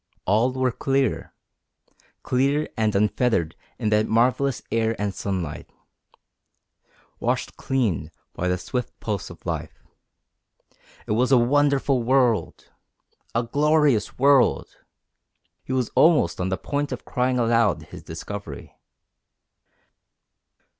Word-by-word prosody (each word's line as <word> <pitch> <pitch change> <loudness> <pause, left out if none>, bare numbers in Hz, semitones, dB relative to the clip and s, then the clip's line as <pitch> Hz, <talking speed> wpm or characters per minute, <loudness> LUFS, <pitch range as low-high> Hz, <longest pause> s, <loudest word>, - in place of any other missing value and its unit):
All 110 +6 +2
were 130 -1 0
clear 135 +2 -1 0.9
clear 140 +4 +1
and 110 -2 0
unfettered 105 -5 +1 0.2
in 110 -4 -1
that 105 0 +2
marvellous 125 +4 +1
air 115 0 +1
and 105 -1 -1
sunlight, 90 -6 -4 1.5
washed - - -2
clean 100 - -1 0.2
by 90 - -2
the 90 0 +1
swift 125 +7 -5
pulse 105 -4 -4
of - - -14
life. - - -4 1.3
It - - -5
was 125 +5 +2
a 130 - +7
wonderful 140 +1 +2
world! 120 -6 +1 0.6
A 115 - +2
glorious 145 -1 +2
world! 135 -1 +3 0.9
He - - -8
was 130 -3 0
almost 150 - +3
on 90 - -1
the 95 - -1
point 145 0 -3
of 125 - -6
crying 125 0 0
aloud 115 -8 +2
his - - -9
discovery. 100 -9 -8
120 Hz, 115 wpm, -24 LUFS, 105-135 Hz, 1.5 s, a